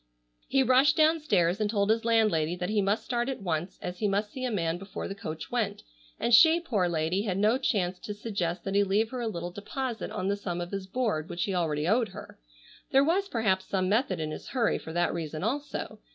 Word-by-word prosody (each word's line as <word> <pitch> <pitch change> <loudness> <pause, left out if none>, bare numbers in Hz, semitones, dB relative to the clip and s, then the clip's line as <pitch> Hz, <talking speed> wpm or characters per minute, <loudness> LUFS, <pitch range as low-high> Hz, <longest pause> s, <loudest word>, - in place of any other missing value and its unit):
He 270 -1 +3
rushed 260 +3 +4
downstairs 295 - +3
and 210 - +1
told 205 -1 +2
his 225 +1 +1
landlady 215 -8 +2
that 180 +2 -3
he 215 -1 +2
must 200 +3 0
start 240 0 -1
at 265 - -3
once, 170 0 -2
as 180 0 -5
he 210 - +1
must 205 +1 0
see 260 - -6
a - - 0
man 170 -6 -1
before 195 +1 -6
the - - -4
coach 160 -4 -7
went, 220 -5 -1 0.4
and 240 - 0
she, 320 +7 +8
poor 210 - 0
lady, 165 +3 0
had 195 -4 -2
no 215 +5 +3
chance 185 -8 0
to 210 - -6
suggest 190 -5 -3
that 195 - -3
he 200 0 +4
leave 205 +3 +1
her 255 -1 -4
a 235 - -1
little 175 -4 -4
deposit 235 +5 -4
on 185 - -3
the 200 - +1
sum 180 -4 -4
of 175 0 -5
his 195 -1 -4
board 195 -8 -1
which 175 - -2
he 195 - -2
already 155 -3 0
owed 225 +2 +2
her. 185 - -11 0.5
There 270 +1 +5
was 380 +6 +1
perhaps 190 -5 +1
some 185 -1 0
method 210 -4 +1
in 155 -1 -3
his - - -7
hurry 245 -4 +1
for 160 - -8
that 175 +1 +1
reason 160 -1 -4
also. 280 +7 -3
200 Hz, 230 wpm, -28 LUFS, 175-235 Hz, 0.5 s, she